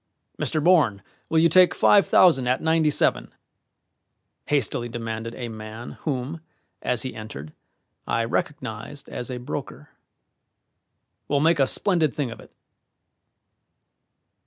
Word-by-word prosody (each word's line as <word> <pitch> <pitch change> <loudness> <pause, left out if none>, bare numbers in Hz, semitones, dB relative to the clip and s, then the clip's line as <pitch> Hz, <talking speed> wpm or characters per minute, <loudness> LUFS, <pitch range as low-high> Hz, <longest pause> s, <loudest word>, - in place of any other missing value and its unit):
"Mr. 155 - 0
Bourne, 150 - +3 0.3
will 160 - +1
you 165 +1 +6
take 180 +2 +5
five 200 -2 +5
thousand 135 -9 +5
at 125 +1 +2
ninety 160 -1 +2
seven?" - - 0 1.2
hastily 120 -4 0
demanded 115 0 -5
a 120 - -5
man 110 +1 -8
whom, 145 +2 -3 0.4
as 125 -3 -1
he 130 - -5
entered, 105 -9 -9 0.5
I 115 - 0
recognized 115 +1 -4
as 125 - -5
a 125 - -4
broker. 125 +2 -7 1.4
"We'll 145 - +1
make 160 +1 +3
a 135 - +4
splendid 165 - +1
thing 140 -5 -2
of 115 - -10
it." - - -15
130 Hz, 125 wpm, -24 LUFS, 115-155 Hz, 1.4 s, you